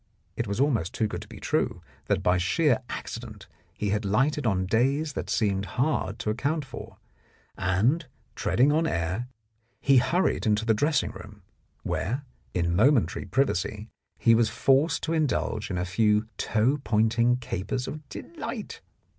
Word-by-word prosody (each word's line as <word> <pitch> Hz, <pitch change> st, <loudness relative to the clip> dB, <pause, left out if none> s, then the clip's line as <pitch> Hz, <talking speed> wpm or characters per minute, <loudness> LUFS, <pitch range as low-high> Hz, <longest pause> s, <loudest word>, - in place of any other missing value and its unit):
It 115 Hz, -, -2 dB
was 100 Hz, +3 st, -3 dB
almost 120 Hz, -, +1 dB
too 110 Hz, -, +1 dB
good -, -, -5 dB
to -, -, -10 dB
be -, -, -11 dB
true, -, -, -1 dB, 0.2 s
that -, -, +1 dB
by 90 Hz, +1 st, +3 dB
sheer 120 Hz, -, +2 dB
accident 110 Hz, -5 st, -7 dB, 0.3 s
he 105 Hz, -, -3 dB
had 105 Hz, +1 st, 0 dB
lighted 125 Hz, +7 st, +1 dB
on 95 Hz, -3 st, +1 dB
days 135 Hz, +9 st, +1 dB
that -, -, -4 dB
seemed 100 Hz, -3 st, +1 dB
hard 120 Hz, -7 st, 0 dB
to 105 Hz, -, -1 dB
account 140 Hz, +6 st, -1 dB
for, 135 Hz, -, -9 dB, 0.6 s
and, 120 Hz, -, +1 dB, 0.3 s
treading 135 Hz, +5 st, +2 dB
on 160 Hz, +2 st, +2 dB
air, 90 Hz, -, -2 dB, 0.5 s
he 135 Hz, -1 st, +4 dB
hurried 170 Hz, +2 st, +2 dB
into 105 Hz, +1 st, +2 dB
the 115 Hz, -, +4 dB
dressing 145 Hz, +6 st, +1 dB
room, -, -, -12 dB, 0.4 s
where, 125 Hz, -, -2 dB, 0.3 s
in 85 Hz, -1 st, +1 dB
momentary 110 Hz, -, +3 dB
privacy, 105 Hz, -1 st, -1 dB, 0.3 s
he 115 Hz, -, +4 dB
was 115 Hz, 0 st, +4 dB
forced 145 Hz, +3 st, +2 dB
to 165 Hz, -, -1 dB
indulge 145 Hz, -8 st, 0 dB
in 95 Hz, -, -2 dB
a 90 Hz, -, -1 dB
few 105 Hz, +4 st, +2 dB
toe 120 Hz, +7 st, +1 dB
pointing 115 Hz, +3 st, +2 dB
capers 125 Hz, +1 st, -3 dB
of 150 Hz, -2 st, -7 dB
delight. 335 Hz, -, -7 dB
115 Hz, 155 wpm, -27 LUFS, 105-140 Hz, 0.6 s, he